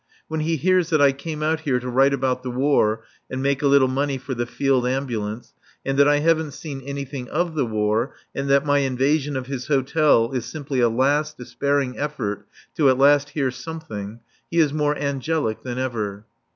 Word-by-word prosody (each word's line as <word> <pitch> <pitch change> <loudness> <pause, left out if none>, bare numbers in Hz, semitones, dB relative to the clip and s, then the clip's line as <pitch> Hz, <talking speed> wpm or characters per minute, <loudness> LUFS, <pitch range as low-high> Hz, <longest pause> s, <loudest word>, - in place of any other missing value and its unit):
When 160 0 -3
he 160 +2 0
hears 180 +2 +2
that 155 -3 +2
I 140 -1 +6
came 155 +3 -6
out 160 +1 +1
here 140 -5 0
to 125 - -7
write 135 +3 +3
about 130 -2 0
the 125 - -5
War 120 -4 +1 0.3
and 130 - -4
make 140 0 0
a 145 - +3
little 140 -1 +5
money 135 +1 -1
for 130 +1 -5
the 120 -1 -2
Field 130 0 +1
Ambulance, 120 -4 -3 0.3
and 135 - 0
that 140 - +6
I 145 0 +4
haven't 160 -2 +1
seen 140 -1 -7
anything 140 -1 -6
of 170 +1 -1
the 140 -6 0
War 110 +3 0 0.2
and 135 0 -3
that 140 +1 +4
my 145 -1 +3
invasion 140 +2 +1
of 130 - -4
his 130 -2 -5
hotel 140 -4 +3
is 125 -3 -2
simply 140 0 -4
a 120 -1 +4
last 145 +6 +1
despairing 140 +1 -1
effort 105 -9 -3 0.3
to 145 -4 +5
at 130 - +3
least 145 +1 +4
hear 135 -3 +1
something, 120 -8 -7 0.3
he 170 - -3
is 155 -4 +4
more 150 -1 +1
angelic 140 -3 -1
than 125 -1 -5
ever. 110 -5 -3
135 Hz, 200 wpm, -23 LUFS, 125-150 Hz, 0.3 s, I